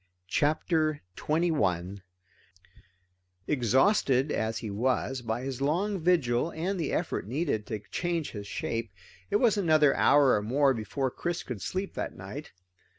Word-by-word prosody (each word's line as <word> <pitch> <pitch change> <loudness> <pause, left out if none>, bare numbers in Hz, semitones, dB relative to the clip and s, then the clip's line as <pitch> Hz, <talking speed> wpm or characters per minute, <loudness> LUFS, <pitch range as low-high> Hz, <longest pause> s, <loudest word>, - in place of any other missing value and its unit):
CHAPTER 155 - +1
21 100 - 0 1.4
Exhausted 135 - +2
as 110 0 -1
he 110 -2 -5
was 130 +4 0
by 115 +1 -3
his 135 -1 -4
long 185 +8 0
vigil 160 -6 +2
and 180 +4 -2
the 165 - -1
effort 165 - -2
needed 130 -4 -1
to 110 -2 -4
change 170 -3 -2
his 100 -2 -7
shape, 115 +1 -3 0.4
it - - -1
was 215 0 +4
another 155 -6 +4
hour 145 -2 +5
or 105 - 0
more 135 +6 +3
before 125 +4 -2
Chris 175 +5 -3
could 120 -6 -6
sleep 190 +1 -3
that - - -5
night. - - -8
140 Hz, 140 wpm, -29 LUFS, 115-165 Hz, 1.4 s, hour